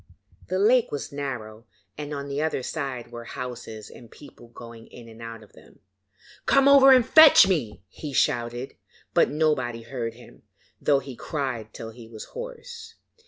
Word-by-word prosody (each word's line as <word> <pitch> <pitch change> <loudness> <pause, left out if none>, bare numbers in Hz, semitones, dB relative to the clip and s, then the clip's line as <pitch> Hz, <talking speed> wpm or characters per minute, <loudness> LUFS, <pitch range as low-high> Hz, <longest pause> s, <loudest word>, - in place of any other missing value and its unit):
The 185 - -2
lake 235 +5 +3
was 145 - -5
narrow, 120 -6 -6 0.3
and 150 0 -7
on 140 -1 -5
the 140 +1 -3
other 155 -4 -1
side 130 -6 -5
were 120 0 -8
houses 115 -4 -7
and 115 - -14
people 120 -2 -15
going 115 -1 -12
in 120 -1 -13
and 115 0 -14
out 115 -1 -8
of 105 - -21
them. - - -19 0.7
'Come 275 0 +4
over 275 -1 +8
and 255 -3 +6
fetch 315 -9 +8
me,' 145 - -2
he 145 +9 -8
shouted, 120 0 -1 0.4
but - - +4
nobody 135 -7 -1
heard 115 -1 -5
him, 120 - -16 0.4
though 145 - +3
he 135 -2 -9
cried 125 -7 -4
till 110 +1 -8
he 115 0 -13
was 110 -2 -9
hoarse. 485 -1 -9
130 Hz, 165 wpm, -25 LUFS, 115-155 Hz, 0.7 s, over